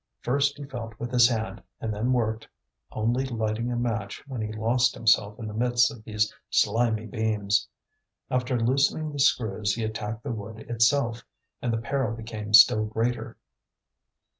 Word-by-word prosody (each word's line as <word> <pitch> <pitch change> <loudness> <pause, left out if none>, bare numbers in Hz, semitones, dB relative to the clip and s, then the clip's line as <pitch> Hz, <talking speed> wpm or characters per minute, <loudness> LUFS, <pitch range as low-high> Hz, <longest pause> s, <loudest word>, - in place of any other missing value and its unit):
First 140 +3 +1
he 145 - -7
felt 120 -5 -8
with 120 +1 -4
his 120 -1 +6
hand 110 -2 -3 0.2
and 110 -1 -3
then 110 +5 -1
worked, 110 -3 0 0.4
only 120 +4 0
lighting 115 -1 -2
a - - -1
match 115 -4 -3
when 130 -4 -5
he 110 0 -3
lost 120 +3 +1
himself 105 -2 +2
in 115 - -7
the 105 - -6
midst 120 +2 +2
of 120 -6 -12
these 105 -1 -1 0.2
slimy 110 0 +2
beams. 105 -2 0 0.6
After 125 -1 0
loosening 140 +6 +1
the 145 - -6
screws 110 -6 +2
he 115 - -3
attacked 110 +1 -4
the 140 - -3
wood 110 0 -6
itself, 120 0 +1 0.4
and 120 - -1
the 115 - 0
peril 120 0 -1
became 110 -2 -7
still 110 +1 +7
greater. 115 +1 -2
115 Hz, 165 wpm, -26 LUFS, 110-125 Hz, 0.6 s, still